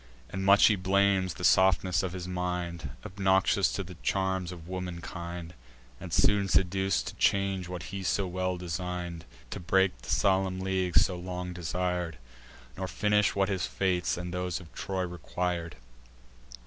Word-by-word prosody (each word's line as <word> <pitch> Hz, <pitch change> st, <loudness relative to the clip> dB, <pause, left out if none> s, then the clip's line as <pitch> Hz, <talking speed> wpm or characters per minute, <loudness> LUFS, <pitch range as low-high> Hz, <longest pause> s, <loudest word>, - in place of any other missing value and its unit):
And 95 Hz, 0 st, -3 dB
much 100 Hz, +1 st, +7 dB
he 105 Hz, -, +5 dB
blames 95 Hz, 0 st, +2 dB
the -, -, -8 dB
softness 90 Hz, -3 st, +4 dB
of 95 Hz, -2 st, -3 dB
his 90 Hz, -1 st, -5 dB
mind, 90 Hz, -2 st, -3 dB, 0.2 s
Obnoxious 95 Hz, -1 st, +2 dB
to 95 Hz, -, -2 dB
the 90 Hz, 0 st, -9 dB
charms 95 Hz, -2 st, 0 dB
of 85 Hz, -2 st, -10 dB
womankind, 85 Hz, -1 st, -6 dB, 0.5 s
And 90 Hz, -1 st, -8 dB
soon 100 Hz, +4 st, +3 dB
seduc'd 95 Hz, +1 st, +2 dB
to -, -, -6 dB
change 95 Hz, -2 st, +1 dB
what 90 Hz, -3 st, -5 dB
he 100 Hz, -, -3 dB
so 95 Hz, +1 st, +1 dB
well 90 Hz, 0 st, -2 dB
design'd; 90 Hz, -1 st, -4 dB, 0.3 s
To -, -, -4 dB
break 95 Hz, +2 st, +2 dB
the 65 Hz, -, -11 dB
solemn 95 Hz, +3 st, +2 dB
league 95 Hz, -2 st, 0 dB
so 90 Hz, -, +5 dB
long 90 Hz, 0 st, -5 dB
desir'd, 90 Hz, -1 st, -2 dB, 0.6 s
Nor 95 Hz, 0 st, -3 dB
finish 105 Hz, +1 st, +2 dB
what 100 Hz, -1 st, +2 dB
his 95 Hz, -3 st, -1 dB
fates, 90 Hz, -3 st, 0 dB
and 90 Hz, 0 st, -5 dB
those 90 Hz, 0 st, -2 dB
of 85 Hz, -3 st, -14 dB
Troy, 95 Hz, -1 st, -2 dB
requir'd. 85 Hz, -1 st, -3 dB
90 Hz, 155 wpm, -29 LUFS, 90-95 Hz, 0.6 s, much